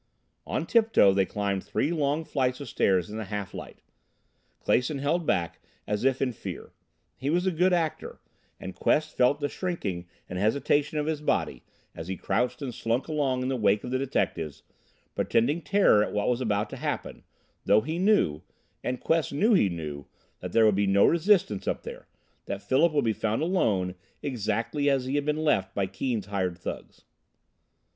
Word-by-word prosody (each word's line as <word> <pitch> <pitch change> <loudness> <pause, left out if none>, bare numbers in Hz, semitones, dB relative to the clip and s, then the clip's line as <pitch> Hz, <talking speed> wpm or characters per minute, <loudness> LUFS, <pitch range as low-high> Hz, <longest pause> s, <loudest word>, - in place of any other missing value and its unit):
On - - -2
tiptoe 225 - +4
they 95 -1 +2
climbed 100 -2 -2
three 150 - -1
long 150 -1 0
flights 130 -3 -1
of 140 - -7
stairs 95 -4 +1
in 110 - -5
the 110 - -4
half 100 -1 -5
light. - - -9 0.8
Clason 125 +4 +2
held 155 +4 0
back 85 -2 0 0.3
as 105 +1 -2
if 135 0 +2
in 125 -2 -1
fear. - - -8 0.4
He 135 +2 -3
was 175 +4 +1
a 190 - +2
good 180 +3 +2
actor, 160 -3 -1 0.4
and 95 - -7
Quest 155 +9 +1
felt 125 +4 +3
the 145 - 0
shrinking 100 - -4 0.2
and 90 - -5
hesitation 140 +7 +1
of 150 - 0
his 155 -1 -2
body 150 - -1 0.3
as 80 - -8
he 95 0 -4
crouched 125 +7 -1
and 125 -3 -4
slunk 115 +3 -1
along 140 -5 0
in - - -1
the 135 - 0
wake 105 -3 +2
of 125 - -5
the 130 - 0
detectives, 80 - -2 0.5
pretending 140 +9 +1
terror 195 - +4
at - - -4
what 105 +2 0
was 125 +1 0
about 105 -3 -1
to - - -6
happen, - - -4 0.4
though 105 +2 +5
he 160 +7 -3
knew 185 - +2 0.4
and 125 0 -3
Quest 165 -1 +1
knew 210 +11 +3
he 105 - +4
knew 75 -5 -6 0.3
that - - -6
there 115 - +5
would 105 - +5
be 100 +1 +1
no 100 +1 +5
resistance 170 - +2
up - - -1
there - - -9 0.4
that 100 0 -4
Philip 155 +6 +3
would 145 -4 +1
be 110 - +2
found 110 +6 -1
alone 105 - +1 0.3
exactly 120 +3 -1
as 135 -2 +1
he 130 - -3
had 145 0 0
been 150 +1 0
left 100 -11 +1
by 100 - +1
Keane's 105 +3 -3
hired 95 -3 -2
thugs. 90 - -8
125 Hz, 185 wpm, -27 LUFS, 100-150 Hz, 0.8 s, though